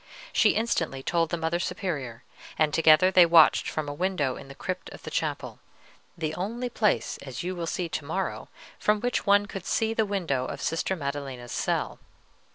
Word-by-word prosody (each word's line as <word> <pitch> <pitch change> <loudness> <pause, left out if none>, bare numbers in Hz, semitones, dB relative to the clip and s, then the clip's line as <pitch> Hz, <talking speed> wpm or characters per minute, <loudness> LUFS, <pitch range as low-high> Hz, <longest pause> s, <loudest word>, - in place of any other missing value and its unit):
She - - +4
instantly 165 -12 -1
told 165 +1 +1
the 170 - -1
Mother 165 +1 -1
Superior; 140 - -4 0.3
and 155 -2 +2
together 160 +3 +6
they 185 -1 +8
watched 165 -2 +6
from 155 -1 -3
a 145 - -3
window 150 -5 -1
in 135 - -10
the 140 - -11
crypt 185 +4 -5
of - - -12
the - - -7
chapel, - - -3 0.6
the 155 -2 -2
only 230 +8 -3
place, 220 -3 0
as 130 +1 -6
you 185 +1 -3
will 170 -1 -4
see 175 +1 -2
to 155 - -4
morrow, 190 +6 -3 0.3
from 210 0 +2
which 245 -1 -1
one 205 0 +5
could 195 -2 -7
see 225 0 +1
the 225 - +2
window 165 -11 -1
of - - -6
Sister 170 +3 -1
Maddelena's 140 -5 -5
cell. - - -1
170 Hz, 185 wpm, -27 LUFS, 145-195 Hz, 0.6 s, they